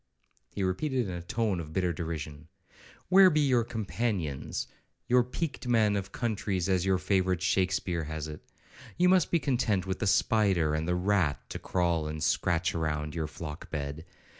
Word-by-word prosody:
he 100 - -4
repeated 125 +7 0
in 95 - -4
a 85 - -5
tone 100 +1 -1
of 80 -2 -7
bitter 90 -1 +1
derision; 80 -2 -5 0.6
'where 190 0 +8
be 155 -3 +2
your 130 -5 +3
companions, 105 - -3 0.4
your 125 0 +5
peaked 130 +1 -4
men 110 -4 +3
of 100 -1 -3
countries, 100 -6 -1
as 95 -2 +2
your 95 -1 +3
favourite 95 -1 +1
Shakespeare 90 -3 0
has 80 0 -4
it? 75 -1 -9 0.5
You 180 +1 +4
must 185 -1 +4
be 170 - +3
content 120 - 0
with 95 -1 -3
the 105 - 0
spider 95 -7 +3
and 80 +1 -1
the 90 - +1
rat, 90 -5 +1
to - - -4
crawl 85 -4 0
and 75 0 -4
scratch 85 +3 +1
round 75 -2 -2
your 80 -2 -2
flock 75 +1 -8
bed! 75 0 -4
95 Hz, 170 wpm, -29 LUFS, 80-110 Hz, 0.6 s, where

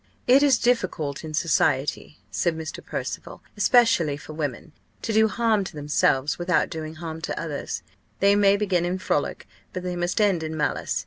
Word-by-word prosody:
"It 260 +3 +6
is 280 -4 +5
difficult 185 - 0
in 155 -1 -5
society," 150 -2 0
said 170 -2 0
Mr. 160 0 -6
Percival, - - -6
"especially 205 - +3
for 155 - -10
women, 150 0 -4 0.3
to 225 - -2
do 220 +1 +5
harm 220 -2 +1
to - - -8
themselves, 145 -1 +1
without 175 -1 +1
doing 160 0 -5
harm 160 0 -6
to - - -3
others. 155 -4 -4 0.4
They 200 +1 +5
may 200 -1 +4
begin 190 -4 +1
in 175 +1 -1
frolic, 185 - -2 0.3
but 185 - -4
they 180 -1 -3
must 175 +2 -1
end 200 -5 +3
in 160 0 -4
malice. 145 -1 -1
175 Hz, 175 wpm, -24 LUFS, 155-205 Hz, 0.4 s, It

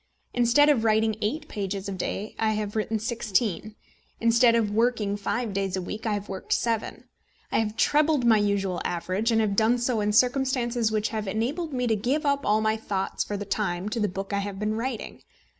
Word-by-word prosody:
Instead 245 +4 +4
of 280 -7 +3
writing 220 0 +2
eight 295 +9 -2
pages 200 -1 -4
a - - -3
day, 195 +2 -4
I 220 -1 +2
have 210 -1 -3
written 220 0 0
sixteen; 215 -2 -1 0.4
instead 230 +1 +4
of 220 -3 +1
working 220 -2 +1
five 210 +2 -2
days 195 -1 -1
a - - -2
week, 215 +5 -5
I 215 - +1
have 205 0 -5
worked 190 -1 -3
seven. 230 -2 -1 0.5
I - - +2
have 220 0 -2
trebled 295 -3 +3
my 225 -2 +5
usual 200 -3 0
average, 185 +6 -1
and 225 - +3
have 205 -2 0
done 225 +3 +3
so 240 -2 0
in 210 0 +1
circumstances 245 -1 +2
which 215 0 0
have 215 -2 -4
enabled 265 - -2
me 250 -2 -1
to 225 -2 +2
give 260 +9 -1
up 280 0 +1
all 210 +1 +3
my 220 0 +1
thoughts 195 -3 -2
for 205 - -4
the 205 - -5
time 195 -1 -2
to 230 - -3
the 210 - +2
book 195 +2 -5
I 200 - +1
have 200 -1 -4
been 210 +1 -1
writing. 230 +1 -4
220 Hz, 210 wpm, -26 LUFS, 205-235 Hz, 0.5 s, my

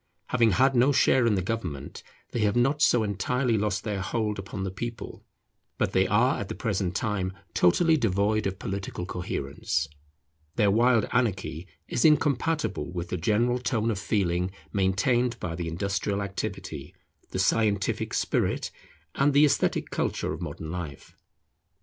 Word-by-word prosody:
Having 115 -3 +3
had 135 +6 +4
no 125 +4 +5
share 130 -3 +4
in 110 - +3
the 95 - -1
government, 90 -10 -4 0.3
they 120 - -2
have 105 -2 +2
not 135 +5 +2
so 120 -5 +4
entirely 115 +5 0
lost 105 -2 0
their 105 -4 -2
hold 105 +2 -2
upon 95 0 -5
the 95 - -3
people; 115 +3 -6 0.5
but - - 0
they - - +3
are - - +3
at - - -5
the - - -4
present 90 -1 -1
time 95 -3 -1 0.2
totally 160 - +4
devoid 110 -2 +1
of 95 -1 -4
political 95 -2 -4
coherence. 85 -3 -2 0.7
Their 105 -2 +3
wild 115 +1 +3
anarchy 100 -8 -1 0.2
is - - -1
incompatible 145 - +2
with 85 -1 -5
the 90 - -2
general 115 +8 +1
tone 115 -2 0
of 100 - -3
feeling 90 -3 0 0.2
maintained 105 +6 +1
by 85 - -4
the 85 0 -4
industrial 100 +3 -1
activity, 100 0 -5 0.3
the - - -4
scientific 100 +1 +1
spirit, - - 0 0.4
and 140 +1 +2
the 145 +1 +7
esthetic 140 -1 +1
culture - - -1
of 80 - -7
modern 80 -1 -6
life. 80 -6 -7
105 Hz, 155 wpm, -27 LUFS, 95-120 Hz, 0.7 s, the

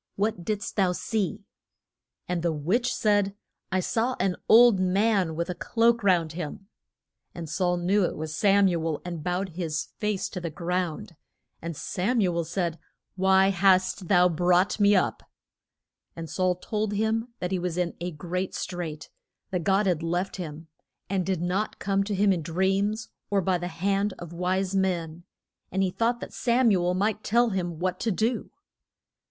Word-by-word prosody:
What 200 -3 -1
did'st 210 +2 -3
thou 185 -3 +3
see? 205 +1 -2 0.8
And 180 -1 -1
the 170 0 +1
witch 185 - 0
said, 205 -2 +1 0.4
I 185 - +1
saw 235 +6 0
an 185 -1 +1
old 230 -3 +7
man 185 -2 +2
with 170 +1 -2
a 180 - -2
cloak 235 +5 +2
round 175 -5 +3
him. 175 +4 -6 0.7
And 170 -2 -6
Saul 180 +2 0
knew 190 +4 +2
it - - -3
was 155 0 -4
Sam 200 +2 +4
u 170 -3 0
el, 160 -2 -1
and 170 -3 -5
bowed 180 +3 -1
his 165 -2 -3
face 210 -2 -1
to 180 - -6
the 170 - -3
ground. 175 +3 -3 0.5
And 165 -2 -5
Sam 225 +7 -1
u 180 -5 +2
el 170 -1 0
said, 170 0 -2 0.4
Why 190 0 +4
hast 185 -1 +2
thou 180 -1 +5
brought 180 +4 +2
me 205 0 +5
up? 185 - +1 0.9
And 165 -1 -6
Saul 185 +2 0
told 210 +3 -2
him 220 +2 0
that 180 - -4
he 185 - 0
was 175 -1 -3
in 175 -1 0
a 175 +1 -3
great 180 +3 -4
strait, 170 -4 -5 0.4
that 180 -3 -1
God 195 +4 +2
had 175 -4 +1
left 175 +4 -2
him, 160 -2 -7 0.4
and 190 -2 +1
did 185 -2 -1
not 190 +4 -1
come 195 0 0
to 205 0 -2
him 200 0 +4
in 175 - -2
dreams 195 +6 0 0.2
or 200 - +2
by 185 -1 +1
the 175 - -3
hand 195 +4 0
of 175 -1 -9
wise 185 +2 -1
men, 175 -3 -1 0.5
and 190 +1 +1
he 185 - 0
thought 235 +4 0
that - - -7
Sam 240 -1 +3
u 185 -3 +2
el 180 +1 +1
might 210 +2 0
tell 235 +2 +3
him 175 -4 -2
what 185 +2 -2
to 230 - -1
do. 220 +4 -1
185 Hz, 180 wpm, -26 LUFS, 175-200 Hz, 0.9 s, old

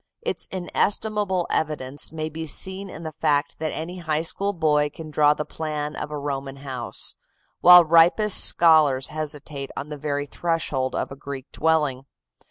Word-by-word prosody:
Its - - -3
inestimable 195 0 0
evidence 145 -3 -1
may 155 -1 -4
be 160 +1 -6
seen 190 +5 0
in 170 - -9
the 160 - -5
fact 145 0 0
that 155 0 -2
any 175 +3 -6
high 160 -2 -1
school 200 +4 -1
boy 150 -5 +1
can 155 +1 -10
draw 150 0 +4
the 150 - -4
plan 150 -1 -4
of - - -5
a 150 - -5
Roman 140 -1 -4
house, 135 -3 -5 0.4
while 180 -1 +9
ripest 170 +6 +5
scholars 155 -6 +4
hesitate 150 -2 -5
on 145 - -5
the 150 - -6
very 145 0 -3
threshold 145 -4 -2
of - - -3
a - - -7
Greek 140 -1 -8
dwelling. 150 -5 0
155 Hz, 165 wpm, -23 LUFS, 145-165 Hz, 0.4 s, while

